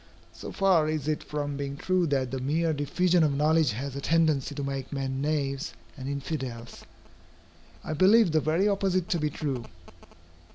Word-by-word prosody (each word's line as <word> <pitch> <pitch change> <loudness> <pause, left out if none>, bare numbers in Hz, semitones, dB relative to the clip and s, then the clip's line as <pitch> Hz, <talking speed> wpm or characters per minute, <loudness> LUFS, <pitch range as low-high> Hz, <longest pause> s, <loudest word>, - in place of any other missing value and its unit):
So - - -8
far 185 -6 +3
is 155 -2 -2
it 155 -1 0
from 145 -1 -4
being 140 0 -4
true 185 +2 +1
that 135 -3 0
the 135 - -2
mere 160 +5 0
diffusion 170 +5 +2
of 145 -3 +2
knowledge 155 -3 +3
has 135 +4 -5
a 140 - -4
tendency 155 -3 +1
to 140 - -3
make 135 -1 -4
men 135 -1 -3
knaves 145 0 -1 0.2
and 135 -2 -6
infidels, 135 -4 -5 1.0
I - - -3
believe 190 +4 +5
the 155 0 +2
very 165 +7 +2
opposite 195 -3 +1
to 170 - +1
be 150 0 0
true. 135 -4 -3
150 Hz, 170 wpm, -27 LUFS, 140-165 Hz, 1.0 s, believe